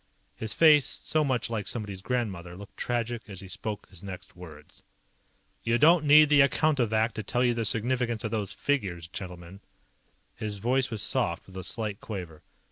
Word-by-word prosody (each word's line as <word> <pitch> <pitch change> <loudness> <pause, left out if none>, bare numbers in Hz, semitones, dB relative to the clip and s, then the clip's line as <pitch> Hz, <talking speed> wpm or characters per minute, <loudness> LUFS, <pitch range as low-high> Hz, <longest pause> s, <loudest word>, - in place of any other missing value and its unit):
His 110 -1 -3
face, 150 -4 +6
so 155 -1 0
much 130 -4 0
like 115 -3 -3
somebody's 105 -5 -3
grandmother, 95 -7 -3
looked 100 0 -12
tragic 120 -1 -2
as 95 -3 -6
he 95 - -9
spoke 105 +2 -5
his 95 -2 -10
next 95 -2 -9
words. 80 -4 -13 0.8
"You 115 +1 +1
don't 160 +3 +5
need 150 +1 +8
the 145 -1 +6
Accountovac 120 -6 +2
to 110 - -4
tell 120 +4 0
you 120 - +3
the 115 -1 -2
significance 120 +1 0
of 110 - -3
those 105 -4 -2
figures, 95 - -2
gentlemen." 90 0 -8 0.7
His 105 -1 -5
voice 125 +5 +1
was 110 -4 -2
soft, 85 -1 0
with 95 - -15
a 95 - -5
slight 105 +1 -4
quaver. 90 -8 -7
110 Hz, 175 wpm, -28 LUFS, 95-125 Hz, 0.8 s, need